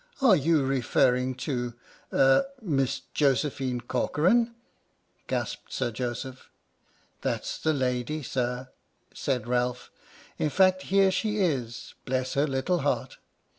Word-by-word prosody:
"Are 255 Hz, -8 st, +6 dB
you 155 Hz, -2 st, +2 dB
referring 130 Hz, -1 st, +2 dB
to 120 Hz, -4 st, -2 dB, 0.2 s
— -, -, -29 dB
er 135 Hz, -, +4 dB
— -, -, -26 dB
Miss 135 Hz, -, 0 dB
Josephine 135 Hz, -2 st, +1 dB
Corcoran? 230 Hz, -, +1 dB, 0.3 s
" -, -, -42 dB
gasped -, -, -3 dB
Sir 120 Hz, -, -1 dB
Joseph. 125 Hz, +2 st, -5 dB, 0.7 s
"That's -, -, -2 dB
the 160 Hz, -, +1 dB
lady, 130 Hz, +2 st, -1 dB
Sir," 125 Hz, 0 st, -2 dB, 0.4 s
said 125 Hz, -3 st, -2 dB
Ralph, 125 Hz, 0 st, -1 dB, 0.5 s
"in 155 Hz, -, +1 dB
fact 185 Hz, +3 st, +4 dB
here 195 Hz, 0 st, +5 dB
she 215 Hz, +2 st, -1 dB
is, 130 Hz, -, -1 dB
bless 130 Hz, 0 st, -1 dB
her 140 Hz, +2 st, +2 dB
little 135 Hz, +6 st, 0 dB
heart -, -, -1 dB
135 Hz, 130 wpm, -27 LUFS, 125-165 Hz, 0.7 s, Are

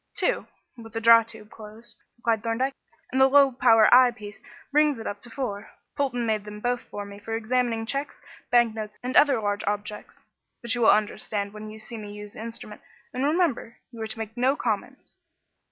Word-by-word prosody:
"Two, -, -, 0 dB, 0.3 s
with 225 Hz, -2 st, -12 dB
the 225 Hz, -, -2 dB
draw 230 Hz, 0 st, +7 dB
tube 220 Hz, -1 st, -12 dB
closed," 220 Hz, +2 st, -12 dB, 0.2 s
replied 230 Hz, -2 st, 0 dB
Thorndyke, 235 Hz, +4 st, -1 dB, 0.4 s
"and 260 Hz, +1 st, +1 dB
the 265 Hz, -, +8 dB
low 280 Hz, 0 st, +5 dB
power 225 Hz, -3 st, +5 dB
eye 250 Hz, 0 st, +8 dB
piece 215 Hz, -3 st, -10 dB, 0.3 s
brings 300 Hz, -1 st, +3 dB
it 225 Hz, -, -8 dB
up 205 Hz, 0 st, -5 dB
to 240 Hz, -, -10 dB
four. 220 Hz, -5 st, -5 dB, 0.3 s
Polton 260 Hz, -5 st, -1 dB
made 215 Hz, -2 st, 0 dB
them 210 Hz, 0 st, -9 dB
both 245 Hz, +2 st, -1 dB
for 205 Hz, 0 st, -8 dB
me 200 Hz, 0 st, -11 dB
for 225 Hz, +2 st, -5 dB
examining 230 Hz, 0 st, 0 dB
cheques, 275 Hz, +5 st, -3 dB, 0.3 s
bank 240 Hz, -2 st, +4 dB
notes 215 Hz, -1 st, -7 dB
and 255 Hz, +1 st, -3 dB
other 280 Hz, -5 st, +5 dB
large 205 Hz, -1 st, -2 dB
objects. 210 Hz, 0 st, -5 dB, 0.4 s
But 235 Hz, 0 st, 0 dB
you 240 Hz, -, -1 dB
will 225 Hz, -, +6 dB
understand 210 Hz, -1 st, 0 dB
when 215 Hz, 0 st, -8 dB
you 215 Hz, -, -10 dB
see 220 Hz, +2 st, -9 dB
me 205 Hz, -1 st, -8 dB
use 210 Hz, 0 st, -9 dB
the -, -, -9 dB
instrument, 225 Hz, -2 st, -9 dB, 0.3 s
and 255 Hz, -, -2 dB
remember, 295 Hz, -7 st, 0 dB
you 230 Hz, -2 st, -10 dB
are 220 Hz, -, -3 dB
to 220 Hz, -, -8 dB
make 220 Hz, 0 st, -6 dB
no 255 Hz, +3 st, +2 dB
comments." -, -, -4 dB
225 Hz, 200 wpm, -25 LUFS, 215-245 Hz, 0.4 s, the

